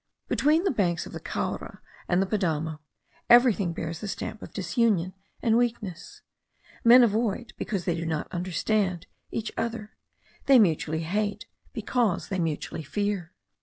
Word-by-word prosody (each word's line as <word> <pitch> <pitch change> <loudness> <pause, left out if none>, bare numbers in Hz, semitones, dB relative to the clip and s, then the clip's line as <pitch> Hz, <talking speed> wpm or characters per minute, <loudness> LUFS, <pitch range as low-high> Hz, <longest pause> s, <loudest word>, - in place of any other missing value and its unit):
Between 310 +4 +3
the 390 - +2
banks 180 - 0
of - - -10
the - - -5
Caura - - -4 0.3
and 175 - +2
the 195 - +3
Padamo 160 -6 -1 0.5
everything 235 -7 +6
bears 165 0 -5
the 210 - -5
stamp 215 +2 -5
of - - -9
disunion 185 -1 +1 0.3
and 230 0 +4
weakness. 220 -8 -3 0.6
Men 245 +2 +8
avoid, 230 +1 0
because 195 -5 -3
they 175 - +1
do 165 0 -3
not 160 -2 -2
understand, 185 +1 -1 0.2
each 225 - -3
other; 225 -2 -3 0.6
they 275 -1 +8
mutually 160 -6 +2
hate, 205 +5 -2 0.3
because 225 -4 0
they 190 - -2
mutually 160 -1 -2
fear. 195 +1 -3
200 Hz, 145 wpm, -27 LUFS, 170-230 Hz, 0.6 s, Men